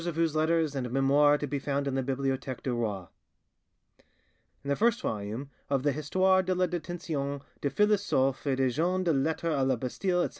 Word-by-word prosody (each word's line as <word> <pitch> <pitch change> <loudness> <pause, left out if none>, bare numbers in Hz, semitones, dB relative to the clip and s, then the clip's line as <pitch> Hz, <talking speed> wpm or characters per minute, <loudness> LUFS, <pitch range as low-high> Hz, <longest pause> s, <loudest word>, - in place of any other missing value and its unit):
of 170 - -2
whose 165 -2 +1
letters 160 -1 +2
and 130 -3 -3
'Memoires' 140 +3 +4
are - - 0
to 145 - -3
be 140 0 -3
found 140 0 -2
in 140 - -1
the 135 - 0
Bibliotheque 135 -1 -2
du 130 - -1
Roi. 105 -6 -2 1.6
"In 140 - -6
the 140 - +2
first 235 - +2
volume 110 - -4 0.2
of 135 -2 +1
the 145 - +3
'Histoire 185 +6 +2
de 185 0 -1
la 180 0 +2
Detention 160 -5 -4 0.2
des 140 - 0
Philosophes 170 -8 +1
et 135 - +2
des 130 -1 +1
Gens 180 +7 0
de 170 -3 +2
Lettres 155 +4 -1
a 140 - 0
la 130 0 +2
Bastille, 175 - -1
etc. - - -1
140 Hz, 200 wpm, -29 LUFS, 135-170 Hz, 1.6 s, Memoires